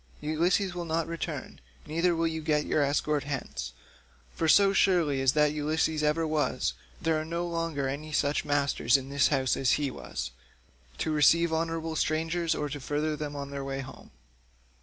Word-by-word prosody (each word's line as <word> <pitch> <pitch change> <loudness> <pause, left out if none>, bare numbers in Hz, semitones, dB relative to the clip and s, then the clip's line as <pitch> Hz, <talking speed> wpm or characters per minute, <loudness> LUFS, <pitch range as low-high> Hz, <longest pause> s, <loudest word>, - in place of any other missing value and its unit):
Ulysses 175 +5 +1
will 175 -1 -4
not 165 0 0
return, 165 - -5 0.2
neither 170 +2 +1
will 165 0 0
you 160 -1 -2
get 150 -1 +1
your 155 - +1
escort 145 +1 +1
hence, 130 - -4 0.6
for 160 - -1
so 195 +4 +6
surely 170 -8 +3
as 135 -1 +3
that 150 -1 +3
Ulysses 155 +1 0
ever 150 +2 +1
was, 155 - 0 0.3
there 160 -1 +1
are - - -4
now 160 - -10
no 170 +1 -2
longer 165 -5 -2
any 150 +3 -5
such 145 -1 +1
masters 140 -4 +2
in 135 0 -7
the 140 0 -6
house 135 -2 +3
as 130 -2 +2
he 145 -3 0
was, 65 - -6 0.7
to 160 - -1
receive 160 +2 +4
honourable 165 0 -2
strangers 160 +2 0
or 150 - -2
to 145 0 -5
further 150 +3 -1
them 150 -1 -5
on 140 0 -5
their 140 -1 -4
way 135 0 -3
home. 130 0 -11
155 Hz, 180 wpm, -28 LUFS, 140-165 Hz, 0.7 s, so